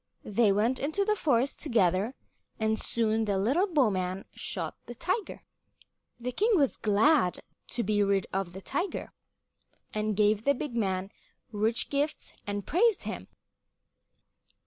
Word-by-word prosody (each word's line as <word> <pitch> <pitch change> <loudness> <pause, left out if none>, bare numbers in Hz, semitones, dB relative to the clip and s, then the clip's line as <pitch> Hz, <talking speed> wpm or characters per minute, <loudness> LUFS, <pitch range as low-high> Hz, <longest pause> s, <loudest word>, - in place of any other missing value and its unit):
They 210 0 +3
went 225 +6 +2
into 315 +8 0
the 425 0 +2
forest 275 - +1
together, 210 - +1 0.4
and 220 0 +1
soon 225 -1 0
the 200 -2 0
little 270 - +2
bowman 195 - +1
shot - - -4
the 240 - -7
tiger. 370 - -2 0.8
The 250 +1 -3
king 435 - +2
was 285 -7 +3
glad 215 - +3 0.2
to 240 - -2
be 205 +1 +1
rid 200 -1 +2
of 190 -2 -2
the 190 - -8
tiger, 345 +8 -3 0.8
and 215 -1 -1
gave 210 0 +3
the 280 +2 +3
big 260 -2 -5
man 195 -3 -1 0.4
rich 225 +2 0
gifts 290 +2 -1
and 205 -1 -3
praised 430 +5 +2
him. - - -5
225 Hz, 140 wpm, -29 LUFS, 205-285 Hz, 0.8 s, They